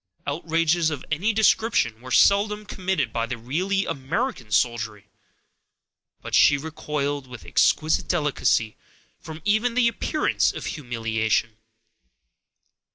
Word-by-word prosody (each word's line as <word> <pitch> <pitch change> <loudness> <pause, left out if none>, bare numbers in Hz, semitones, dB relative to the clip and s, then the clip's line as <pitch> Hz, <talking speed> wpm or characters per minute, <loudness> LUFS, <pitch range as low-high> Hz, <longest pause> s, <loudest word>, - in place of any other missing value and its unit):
Outrages 165 +2 +1
of 145 -4 -6
any 180 +9 +1
description 210 - +2
were 130 - -10
seldom 210 +8 +3
committed 185 - -2
by 115 0 -1
the 125 0 -4
really 185 - -1
American 135 - -3
soldiery; 110 -2 -1 1.1
but - - -8
she 140 - +6
recoiled, 145 -2 -4
with 125 -2 -11
exquisite 155 0 +2
delicacy, 145 -9 0 0.4
from 160 -1 -10
even 220 +3 +1
the 250 -2 +4
appearance 300 +6 0
of - - -7
humiliation. 115 -4 -2
150 Hz, 110 wpm, -24 LUFS, 120-190 Hz, 1.1 s, she